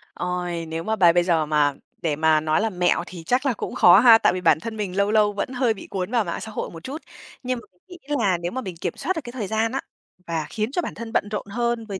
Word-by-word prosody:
Ôi, 180 Hz, -2 st, -3 dB
nếu 160 Hz, +1 st, -4 dB
mà 220 Hz, 0 st, -1 dB
bài 175 Hz, -4 st, +5 dB
bây 175 Hz, 0 st, +3 dB
giờ 165 Hz, -3 st, +2 dB
mà 150 Hz, -2 st, +2 dB, 0.3 s
để 160 Hz, -4 st, 0 dB
mà 155 Hz, +1 st, +3 dB
nói 155 Hz, +4 st, +1 dB
là 225 Hz, -, +1 dB
mẹo 180 Hz, -2 st, +1 dB
thì 175 Hz, -3 st, -9 dB
chắc 250 Hz, -, 0 dB
là 265 Hz, -, +2 dB
cũng -, -, -6 dB
khó 180 Hz, +3 st, +7 dB
ha. 230 Hz, -1 st, +8 dB
Tại 225 Hz, -, +2 dB
vì 185 Hz, -, -3 dB
bản 155 Hz, -3 st, +4 dB
thân 225 Hz, +2 st, -6 dB
mình 195 Hz, -3 st, -3 dB
lâu 200 Hz, +1 st, +2 dB
lâu 210 Hz, -1 st, +3 dB
vẫn 200 Hz, -, -3 dB
hơi 245 Hz, -3 st, +1 dB
bị 195 Hz, -, -11 dB
cuốn 190 Hz, +3 st, -3 dB
vào 235 Hz, -3 st, +2 dB
mạng 170 Hz, -, -4 dB
xã 220 Hz, -, -7 dB
hội -, -, -4 dB
một 165 Hz, -1 st, -11 dB
chút. 290 Hz, +5 st, -6 dB, 0.4 s
Nhưng 250 Hz, -1 st, -2 dB
mà -, -, -16 dB, 0.2 s
mình 360 Hz, -, -11 dB
nghĩ 290 Hz, +2 st, -3 dB
là 190 Hz, -5 st, +2 dB
nếu 175 Hz, +1 st, -4 dB
mà 260 Hz, -, -3 dB
mình 185 Hz, -5 st, -6 dB
kiểm -, -, -2 dB
soát 375 Hz, -, -2 dB
được 320 Hz, -, -3 dB
cái 240 Hz, -, -8 dB
thời 220 Hz, -6 st, -4 dB
gian 220 Hz, +2 st, 0 dB
á, 270 Hz, -, -2 dB, 0.5 s
và 160 Hz, -2 st, -2 dB
khiến 220 Hz, +2 st, -2 dB
cho 355 Hz, -, 0 dB
bản -, -, -5 dB
thân 230 Hz, -1 st, -7 dB
bận 205 Hz, -, +1 dB
rộn 210 Hz, -, -3 dB
hơn 235 Hz, +1 st, -1 dB
với 195 Hz, -3 st, -6 dB
205 Hz, 295 wpm, -23 LUFS, 175-235 Hz, 0.5 s, ha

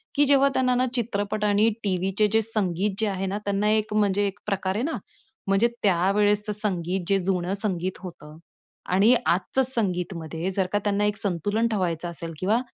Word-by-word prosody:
की 290 Hz, -, +4 dB
जेव्हा 275 Hz, 0 st, +4 dB
त्यांना 255 Hz, -1 st, +2 dB
ना 250 Hz, +1 st, +2 dB
चित्रपट 210 Hz, -3 st, -2 dB
आणि 210 Hz, +2 st, +4 dB
टीव्हीचे 195 Hz, +2 st, +1 dB
जे 225 Hz, -, +4 dB
संगीत 205 Hz, -3 st, -1 dB
जे 220 Hz, -, +2 dB
आहे 195 Hz, -1 st, -2 dB
ना 195 Hz, +2 st, -2 dB
त्यांना 200 Hz, +1 st, +1 dB
एक 215 Hz, -1 st, 0 dB
म्हणजे 205 Hz, -1 st, +2 dB
एक 200 Hz, +1 st, -6 dB
प्रकारे 195 Hz, +1 st, -1 dB
ना 325 Hz, -, -2 dB, 0.5 s
म्हणजे 195 Hz, +4 st, +3 dB, 0.2 s
त्यावेळेसचं 205 Hz, +3 st, +2 dB
संगीत 190 Hz, -3 st, -2 dB
जे 195 Hz, 0 st, +3 dB
जुनं 185 Hz, 0 st, -1 dB
संगीत 185 Hz, -3 st, -2 dB
होतं 155 Hz, -4 st, -10 dB, 0.6 s
आणि 205 Hz, +6 st, +5 dB
आजचं 185 Hz, +9 st, +1 dB
संगीतमध्ये 180 Hz, -7 st, -2 dB
जर 190 Hz, 0 st, 0 dB
का 205 Hz, -, +1 dB
त्यांना 205 Hz, 0 st, +1 dB
एक 210 Hz, 0 st, 0 dB
संतुलन 205 Hz, +4 st, 0 dB
ठेवायचं 175 Hz, -6 st, -1 dB
असेल 165 Hz, -1 st, -6 dB
किंवा 215 Hz, +6 st, +2 dB
200 Hz, 170 wpm, -25 LUFS, 185-215 Hz, 0.6 s, आणि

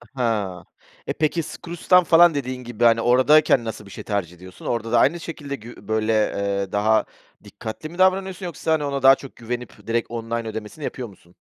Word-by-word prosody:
Ha, 105 Hz, -8 st, -1 dB, 0.4 s
e, -, -, -1 dB
peki, 155 Hz, +2 st, 0 dB
Skroutz'tan 175 Hz, +3 st, +1 dB
falan 170 Hz, 0 st, +6 dB
dediğin 130 Hz, -2 st, -4 dB
gibi 120 Hz, -1 st, -4 dB
hani 115 Hz, -1 st, +5 dB
oradayken 130 Hz, +2 st, +4 dB
nasıl 110 Hz, -2 st, -6 dB
bir 100 Hz, -, -13 dB
şey -, -, -8 dB
tercih 95 Hz, -5 st, -3 dB
ediyorsun? 90 Hz, +1 st, -13 dB
Orada 115 Hz, -1 st, -2 dB
da 120 Hz, -, +4 dB
aynı 170 Hz, +8 st, +3 dB
şekilde 145 Hz, -4 st, -6 dB
gü 120 Hz, +1 st, -12 dB
böyle, 110 Hz, 0 st, +1 dB
eee, 100 Hz, -2 st, 0 dB
daha 110 Hz, +2 st, +2 dB, 0.4 s
dikkatli 110 Hz, +7 st, -8 dB
mi 175 Hz, -, -12 dB
davranıyorsun 190 Hz, 0 st, +1 dB
yoksa 165 Hz, -1 st, -3 dB
hani 150 Hz, -2 st, 0 dB
ona 140 Hz, -1 st, -2 dB
daha 135 Hz, 0 st, +8 dB
çok 135 Hz, 0 st, -12 dB
güvenip 120 Hz, 0 st, -7 dB
direkt 115 Hz, 0 st, -1 dB
online 115 Hz, 0 st, -3 dB
ödemesini 110 Hz, +7 st, -7 dB
yapıyor 125 Hz, -3 st, -4 dB
musun? 90 Hz, -3 st, -19 dB
120 Hz, 190 wpm, -22 LUFS, 110-150 Hz, 0.4 s, daha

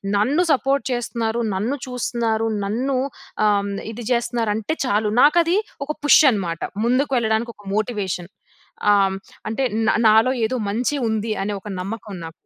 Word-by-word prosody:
నన్ను 275 Hz, -, +2 dB
సపోర్ట్ 270 Hz, -1 st, +1 dB
చేస్తున్నారు, 235 Hz, -1 st, -1 dB
నన్ను 225 Hz, +9 st, -1 dB
చూస్తున్నారు, 230 Hz, -2 st, -1 dB, 0.2 s
నన్ను 255 Hz, +6 st, -1 dB, 0.5 s
ఆహ్, 200 Hz, -1 st, +1 dB, 0.2 s
ఇది 230 Hz, +1 st, -8 dB
చేస్తున్నారు, 235 Hz, -2 st, 0 dB
అంటే 220 Hz, +8 st, -2 dB
చాలు 210 Hz, -3 st, +1 dB
నాకది 335 Hz, +5 st, +4 dB, 0.3 s
ఒక 300 Hz, -, -3 dB
పుష్ 290 Hz, -, +7 dB
అన్నమాట. 175 Hz, -6 st, -3 dB, 0.2 s
ముందుకు 260 Hz, +4 st, +1 dB
వెళ్ళడానికి 225 Hz, +1 st, 0 dB
ఒక 205 Hz, -, -18 dB
మోటివేషన్. 200 Hz, -4 st, -2 dB, 0.6 s
ఆహ్, 195 Hz, -1 st, +2 dB, 0.3 s
అంటే 225 Hz, +5 st, -1 dB, 0.2 s
నా -, -, +4 dB, 0.2 s
నాలో 220 Hz, +4 st, +5 dB, 0.2 s
ఏదో 255 Hz, -, -3 dB, 0.2 s
మంచి 245 Hz, +6 st, 0 dB
ఉంది 220 Hz, 0 st, -1 dB
అనే 205 Hz, +1 st, -2 dB
ఒక 210 Hz, -, -11 dB
నమ్మకం 210 Hz, +2 st, -6 dB
నాకు. 165 Hz, -, -8 dB
225 Hz, 145 wpm, -21 LUFS, 210-250 Hz, 0.6 s, పుష్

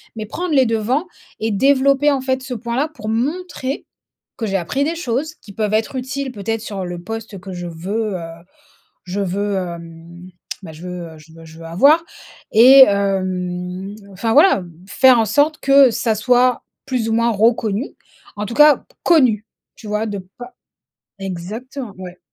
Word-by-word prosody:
mais 215 Hz, -1 st, -5 dB
prendre 320 Hz, +8 st, -3 dB
les 265 Hz, -2 st, +5 dB
devants 230 Hz, -, 0 dB, 0.3 s
et 220 Hz, 0 st, -1 dB
développer 275 Hz, +5 st, +3 dB
en 275 Hz, -2 st, 0 dB
fait 260 Hz, 0 st, -1 dB
ce 260 Hz, -1 st, -6 dB
point 235 Hz, +1 st, -4 dB
là. 290 Hz, +3 st, +1 dB
Pour 215 Hz, -8 st, -7 dB
montrer, 275 Hz, +3 st, -3 dB, 0.5 s
que 225 Hz, -, -3 dB
j'ai 195 Hz, -1 st, 0 dB
appris 195 Hz, +10 st, -1 dB
des 320 Hz, +3 st, -1 dB
choses, 310 Hz, 0 st, -3 dB
qui 200 Hz, -, -15 dB
peuvent 215 Hz, 0 st, -2 dB
être 225 Hz, +4 st, -1 dB
utiles 265 Hz, +1 st, -4 dB
peut-être 225 Hz, 0 st, -3 dB
sur 200 Hz, -4 st, -5 dB
le 175 Hz, -1 st, -6 dB
poste 225 Hz, +1 st, -7 dB
que 190 Hz, +1 st, -9 dB
je 175 Hz, 0 st, -6 dB
veux, 195 Hz, +6 st, -3 dB
heu, -, -, -7 dB, 0.8 s
je 190 Hz, +2 st, -4 dB
veux, 200 Hz, +1 st, -1 dB
hem, 170 Hz, -1 st, -8 dB, 0.3 s
bah, 160 Hz, -4 st, -9 dB
je 155 Hz, -, -13 dB
veux 170 Hz, -3 st, -8 dB
je 155 Hz, +1 st, -17 dB
veux 165 Hz, 0 st, -13 dB
je 160 Hz, 0 st, -14 dB
veux 165 Hz, -, -10 dB
avoir 280 Hz, -, +4 dB, 0.5 s
et 260 Hz, +5 st, +9 dB
hem 185 Hz, -1 st, -2 dB, 0.2 s
enfin 225 Hz, +5 st, -1 dB
voilà, 300 Hz, -, +6 dB
hem, 175 Hz, -3 st, -9 dB
faire 245 Hz, +5 st, +5 dB
en 225 Hz, -, +2 dB
sorte 290 Hz, +8 st, +2 dB
que, 275 Hz, -1 st, +6 dB
ça 225 Hz, -1 st, 0 dB
soit, 250 Hz, +3 st, +2 dB, 0.2 s
plus 250 Hz, -4 st, -1 dB
ou -, -, +1 dB
moins 230 Hz, +1 st, +2 dB
reconnu. 220 Hz, +2 st, +1 dB, 0.5 s
En 210 Hz, -, -3 dB
tout 235 Hz, -, -6 dB
cas 295 Hz, +2 st, +6 dB, 0.2 s
connu, 255 Hz, -, +4 dB, 0.3 s
tu 220 Hz, -, -11 dB
vois 210 Hz, +1 st, -1 dB
de 205 Hz, -2 st, -4 dB, 0.2 s
pas 245 Hz, 0 st, -10 dB, 0.6 s
exactement 210 Hz, +7 st, -6 dB
ouais. 180 Hz, -1 st, -9 dB
220 Hz, 175 wpm, -19 LUFS, 190-260 Hz, 0.8 s, et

